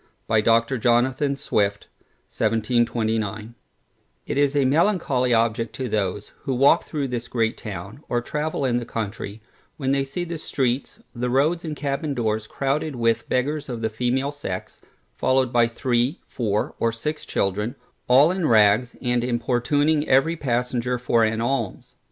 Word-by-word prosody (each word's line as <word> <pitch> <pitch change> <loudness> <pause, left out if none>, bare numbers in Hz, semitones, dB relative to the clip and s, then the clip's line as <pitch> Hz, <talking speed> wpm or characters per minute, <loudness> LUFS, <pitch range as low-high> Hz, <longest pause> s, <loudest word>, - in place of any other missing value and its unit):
by 110 -1 +3
Dr. 115 +3 +2
Jonathan 130 +4 +2
Swift 100 -6 -1 0.4
1729 110 -1 0 0.7
It - - -3
is 145 0 +2
a 140 -2 +3
melancholy 140 -4 +2
object 115 0 +1
to 130 - -3
those, 105 -2 -2
who 135 - -2
walk 140 +6 +4
through 145 -3 -2
this 120 -1 -4
great 115 -2 0
town, 105 +4 -8
or 120 - +1
travel 150 +3 -2
in 120 -2 +1
the 120 - -2
country, 110 -1 -5 0.3
when 135 -2 -1
they 140 0 +2
see 140 +6 -4
the 170 -2 -5
streets, 130 -3 -2
the 125 0 -2
roads, 150 +7 +2
and 155 -2 -4
cabbin 140 +1 -2
doors 110 -2 -1
crowded 140 +3 -1
with 115 -1 0
beggars 145 +3 -1
of 120 -2 -4
the 110 -1 -1
female 125 +5 0
sex, 120 -11 -6 0.3
followed 130 -1 +1
by 120 -1 +4
three, 120 +2 0
four, 105 -4 -1
or 115 - +2
six 150 +7 -4
children, 105 +4 -1 0.3
all 135 +6 +6
in 185 -4 0
rags, 110 +2 +4
and 125 -1 +1
importuning 130 +5 +1
every 135 +6 +4
passenger 125 -3 -1
for 120 -2 +2
an 110 0 +1
alms. 120 -5 -3
125 Hz, 155 wpm, -23 LUFS, 115-140 Hz, 0.7 s, all